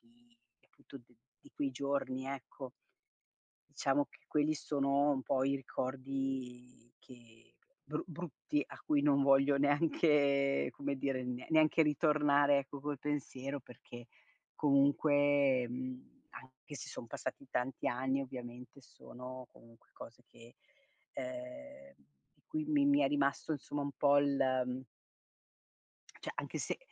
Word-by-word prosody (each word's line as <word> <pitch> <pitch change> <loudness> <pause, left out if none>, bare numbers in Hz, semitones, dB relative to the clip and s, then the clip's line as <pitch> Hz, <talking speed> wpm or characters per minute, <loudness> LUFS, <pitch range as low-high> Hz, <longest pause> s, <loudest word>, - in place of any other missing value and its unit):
di 235 0 -30
tutti 120 -3 -13 0.3
di - - -17
quei 140 -2 -1
giorni, 135 -1 -2
ecco. 135 -1 -7 1.1
Diciamo 140 +1 +2
che - - -21
quelli 150 +1 +1
sono 140 -1 +1
un 135 - 0
po' 130 0 +1
i 135 +1 +2
ricordi 130 -2 -4
che 115 -2 -18 0.3
bru - - -3
brutti 165 -3 -3
a - - -11
cui 145 -2 +2
non 140 -1 +4
voglio 135 +1 +5
neanche 145 -2 +3
come 140 0 -3
dire, 130 -1 -1
ne 125 0 -4
neanche 155 +1 +5
ritornare 145 -1 +4
ecco 140 +1 -4
col 145 0 -3
pensiero 140 -1 -3
perché 120 -1 -12 0.5
comunque, 140 -2 +3
mhmm, 130 - -7
anche 130 - -13
se - - -7
son - - -7
passati 130 +3 -6
tanti 125 +2 -2
anni 130 +2 0
ovviamente 125 0 -9
sono 125 0 -10
comunque 115 0 -20
cose 120 +1 -12
che 115 0 -17 0.6
ehm, 290 -3 -8 0.6
mi 310 0 -1
mi 295 -2 +3
mi 285 0 +5
è - - +4
rimasto 140 +2 0
insomma 145 0 -3
un 140 - -3
po' 140 +2 +4
il 130 -2 +1 1.4
cioè - - -4
anche - - -4
se - - -3
140 Hz, 125 wpm, -34 LUFS, 130-145 Hz, 1.4 s, voglio